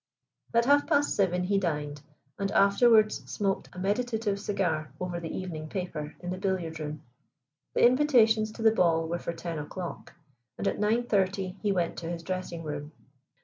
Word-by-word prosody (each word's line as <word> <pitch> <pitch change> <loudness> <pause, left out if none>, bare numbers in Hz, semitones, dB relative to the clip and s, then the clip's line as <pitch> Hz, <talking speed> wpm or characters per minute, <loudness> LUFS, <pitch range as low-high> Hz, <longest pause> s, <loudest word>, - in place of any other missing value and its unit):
At 235 0 +4
half 285 +2 +4
past 290 -2 +2
seven 180 -3 +1
he 195 +2 +2
dined, 150 -5 -2 0.4
and 200 0 -1
afterwards 215 +2 +5
smoked 195 -2 -1
a - - -14
meditative 210 +1 -1
cigar 165 -8 -1
over 180 -1 -3
the 165 -1 -5
evening 160 -4 -5
paper 155 -5 -4
in 180 0 -4
the 185 - -4
billiard 180 -5 -2
room. 150 -1 -5 0.7
The - - +5
invitations 240 -5 +4
to 225 - -6
the 220 - +7
ball 165 -5 +2
were 170 +1 -2
for 170 - -4
ten 165 -1 -5
o'clock, 170 +4 -7 0.4
and - - -2
at - - -1
nine 220 +3 +2
thirty 195 -4 0
he 205 - +1
went 175 -3 -1
to 165 - -5
his 170 -1 -5
dressing 180 -2 -4
room. 145 0 -5
185 Hz, 175 wpm, -28 LUFS, 165-215 Hz, 0.7 s, the